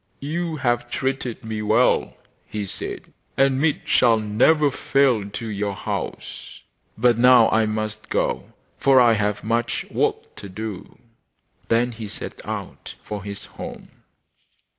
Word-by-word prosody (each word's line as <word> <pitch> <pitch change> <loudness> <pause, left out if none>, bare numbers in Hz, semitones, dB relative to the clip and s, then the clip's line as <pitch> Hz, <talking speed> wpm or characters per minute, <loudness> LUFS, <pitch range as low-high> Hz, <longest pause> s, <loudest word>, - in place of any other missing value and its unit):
'You 165 +3 -3
have 120 -4 0
treated 130 -5 -3
me 110 -1 -3
well,' 110 +4 +2 0.3
he 105 -1 -4
said, 95 - -6 0.2
'and 135 0 +3
meat 150 -1 +1
shall 115 -2 +4
never 130 +8 +3
fail 125 -8 +2
to 115 - -6
your 100 -2 -3
house. - - -6 0.4
But 120 0 +3
now 125 -2 +7
I 110 0 +3
must 110 0 -4
go, - - -1 0.3
for 135 -1 +5
I 120 -2 +6
have 105 -1 -1
much 115 +2 -1
work - - -1
to 100 - -9
do.' 105 0 -7 0.7
Then 120 +2 +2
he 110 -2 -7
set - - -8
out - - -6
for 105 -2 -6
his 100 0 -7
home. - - -9
115 Hz, 140 wpm, -23 LUFS, 105-130 Hz, 0.7 s, now